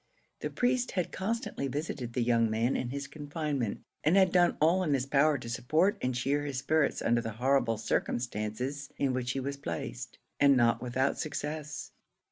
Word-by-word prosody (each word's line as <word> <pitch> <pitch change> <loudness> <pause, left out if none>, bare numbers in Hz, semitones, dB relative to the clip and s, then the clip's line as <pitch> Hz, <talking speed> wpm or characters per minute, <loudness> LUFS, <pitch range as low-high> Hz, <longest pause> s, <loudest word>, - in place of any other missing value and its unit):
The - - -3
priest 250 0 0
had 180 -3 -1
constantly 220 - -2
visited 135 -4 -4
the 125 - +1
young 115 -1 +3
man 115 +4 +1
in 120 - -2
his 140 +2 -4
confinement, 145 -5 -3 0.2
and 160 +6 +4
had 190 -2 +5
done 175 -1 +4
all 170 +5 +4
in 155 -6 +2
his 130 -1 -1
power 145 +2 +3
to 120 - -8
support 155 - +1
and 125 0 -1
cheer 140 +3 0
his 140 -3 -3
spirits 145 +3 +1
under 120 0 +3
the 115 -2 -5
horrible 125 -1 +2
circumstances 120 +4 -2
in 135 -2 +1
which 125 0 -1
he 135 - -2
was 140 +1 -3
placed, 85 - -5 0.2
and 140 -2 +6
not 120 -1 +3
without 130 +2 0
success. 150 0 -4
140 Hz, 180 wpm, -30 LUFS, 120-155 Hz, 0.2 s, and